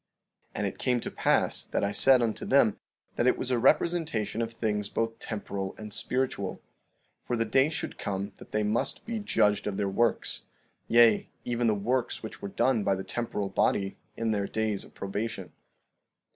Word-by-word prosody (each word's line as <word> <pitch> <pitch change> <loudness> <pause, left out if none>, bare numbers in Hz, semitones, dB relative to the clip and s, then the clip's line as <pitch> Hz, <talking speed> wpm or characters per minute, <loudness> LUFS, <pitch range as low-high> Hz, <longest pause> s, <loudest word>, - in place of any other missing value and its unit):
15:32 - - -43
And - - -1
it - - -6
came 125 -1 +1
to - - -5
pass - - +2
that - - -2
I 100 - +1
said 130 +3 +6
unto 110 -2 -1
them - - +3 0.4
that 120 - +2
it - - +4
was 130 - -2
a 125 - +2
representation 135 - +2
of 115 0 -2
things 105 -3 -2
both 115 0 -2
temporal 100 -3 -4
and 105 -1 -8
spiritual; 120 -4 -2 0.6
for 120 - -1
the 115 -1 0
day 135 +6 +3
should 160 - -5
come 100 0 -3
that - - -14
they 105 0 +1
must 105 +2 -1
be 230 -1 -3
judged 105 - +2
of 100 -2 -2
their 100 - 0
works, 115 +4 0 0.4
yea, 115 -2 +5 0.2
even 120 -1 0
the 110 - +3
works 120 +5 -1
which 110 - -8
were 100 - -4
done 115 +2 +2
by 100 - +2
the 95 - -5
temporal 105 -4 -3
body 95 0 +1 0.2
in 115 -1 0
their 100 -2 0
days 110 -2 -1
of - - -16
probation. 100 -1 -4
110 Hz, 185 wpm, -28 LUFS, 100-120 Hz, 0.6 s, said